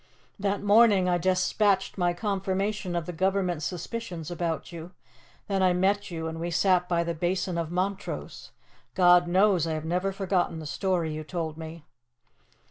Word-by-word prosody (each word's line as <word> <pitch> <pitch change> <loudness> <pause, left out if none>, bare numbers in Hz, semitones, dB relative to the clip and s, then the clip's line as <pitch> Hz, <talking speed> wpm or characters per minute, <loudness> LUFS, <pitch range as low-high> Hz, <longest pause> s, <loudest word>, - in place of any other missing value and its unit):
That 200 0 -1
morning 205 -2 +5
I 175 -1 +2
despatched 190 +2 +1
my 175 -2 +1
confirmation 195 0 -2
of 170 -2 -1
the 180 - -6
Government's 185 -2 0
suspicions 180 -2 -6
about 170 0 -3
you. 170 +2 -9 0.5
Then 195 -2 0
I 185 -1 +4
met 195 +3 +1
you 165 -2 -5
and 160 0 -5
we 170 +1 -3
sat 180 +1 +2
by 170 -1 +2
the 170 0 -2
Basin 175 +2 -1
of 165 -2 -2
Montrose. 190 +3 -4 0.5
God 175 -1 +5
knows 185 -2 +3
I 160 - -1
have 155 0 -5
never 180 +4 0
forgotten 190 -3 -1
the 160 - -7
story 170 0 -1
you 155 0 -5
told 160 -1 -4
me. 160 0 -9
180 Hz, 165 wpm, -27 LUFS, 170-195 Hz, 0.5 s, morning